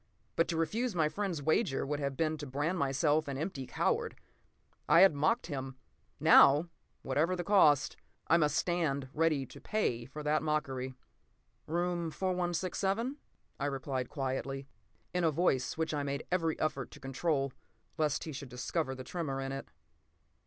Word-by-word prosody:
But 165 - +2
to 165 - -2
refuse 220 +7 0
my 160 -3 +2
friend's 185 -5 -3
wager 155 -1 +1
would 145 +1 -2
have 140 -2 -2
been 155 -1 +1
to 145 - -5
brand 150 +7 -1
myself 145 +3 +2
an 140 -1 -3
empty 145 -4 -4
coward. - - 0 0.7
I 170 - +7
had 195 -3 +8
mocked 155 +12 +1
him. 135 -4 -5 0.4
Now, 150 +5 +7 0.3
whatever 165 +5 +1
the 175 - -3
cost, 160 -8 +4 0.3
I 170 - +4
must 150 -2 +2
stand 160 -6 0
ready 155 -3 +2
to - - -13
pay 125 - -1
for 150 +4 -8
that 150 +1 +2
mockery. 135 -4 -2 0.7
"Room 175 0 -1
4167?" 185 - -1 0.4
I 140 - -1
replied 135 -2 -3
quietly, 135 -1 -3 0.5
in 180 -1 0
a 165 - +4
voice 145 -5 +1
which 160 -1 -1
I 145 - 0
made 140 0 -3
every 165 -3 0
effort 155 -1 -1
to - - -13
control, 135 0 -1 0.5
lest 150 -2 +1
he 160 - -5
should 140 -2 -7
discover 130 +3 -2
the 130 - -7
tremor 145 -4 -3
in 135 0 -3
it. 135 0 -6
150 Hz, 160 wpm, -32 LUFS, 135-170 Hz, 0.7 s, had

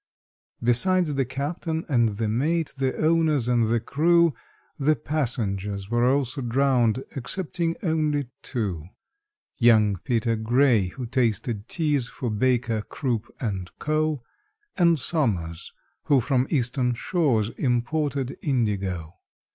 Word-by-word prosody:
Besides 165 +7 +3
the 135 -1 0
captain 160 +5 -3
and 115 -7 +2
the 110 0 -1
mate, 150 +9 0
the 135 -1 -1
owners 155 -5 +2
and 120 -2 +2
the 115 +1 +2
crew, 165 +6 +3 0.5
The 150 +2 +3
passengers 105 -10 -3
were 120 +2 +3
also 135 0 -1
drowned 125 -1 +2
excepting 165 +4 -2
only 155 -5 0
two: 100 - -3 0.7
Young 110 -5 +4
PETER 115 +2 0
GRAY, 115 -2 +3
who 125 +7 -6
tasted 115 -3 -1
teas 150 -7 +1
for 125 -3 -4
BAKER, 115 0 +1
CROOP, 120 -1 -3
AND 95 -7 -3
CO., 155 -3 -1 0.5
And 170 -3 +4
SOMERS, 105 - -1 0.3
who 140 -2 +4
from 130 +1 +1
Eastern 125 -2 0
shores 120 - +1
imported 135 +2 -1
indigo. 95 - -1
125 Hz, 115 wpm, -25 LUFS, 115-150 Hz, 0.7 s, Young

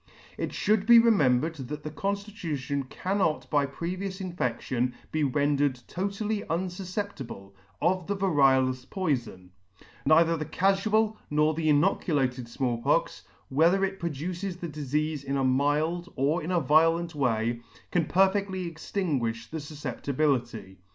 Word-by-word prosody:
It - - -3
fhould 210 -1 +1
be 235 -1 +9
remembered 160 - +4
that 145 +3 -6
the 155 - -5
conditution 160 -7 -3
cannot 185 -3 -1
by 145 -2 +2
pre 170 +6 -4
vious 190 0 -5
infedion 125 -3 -1 0.2
be 155 -1 0
rendered 145 -1 +1
totally 200 +3 -2
unfufceptible 180 - -4 0.3
of 180 0 +1
the 200 0 -1
variolous 135 -8 +3
poifon 125 - -2 0.3
j - - -22 0.2
neither 165 +2 +5
the 155 -1 -3
cafual 215 +3 +2
nor 150 +1 +2
the 155 0 0
inoculated 145 -6 +1
Small 120 -1 -2
Pox, - - 0 0.2
whether 170 +8 +3
it 195 0 -5
produces 175 +4 -4
the 175 - -5
difeafe 150 0 -2
in 140 0 -2
a 135 - +1
mild 150 +7 +1
or 145 +6 +1
in 160 - -5
a 180 -1 +2
violent 165 +3 +3
way, 120 -4 0 0.3
can 175 -3 +2
per 190 +3 +4
fedly 190 -3 -2
extinguifli 130 - -2
the 160 - -3
fufceptibility. 140 -8 -2
155 Hz, 135 wpm, -27 LUFS, 135-185 Hz, 0.3 s, be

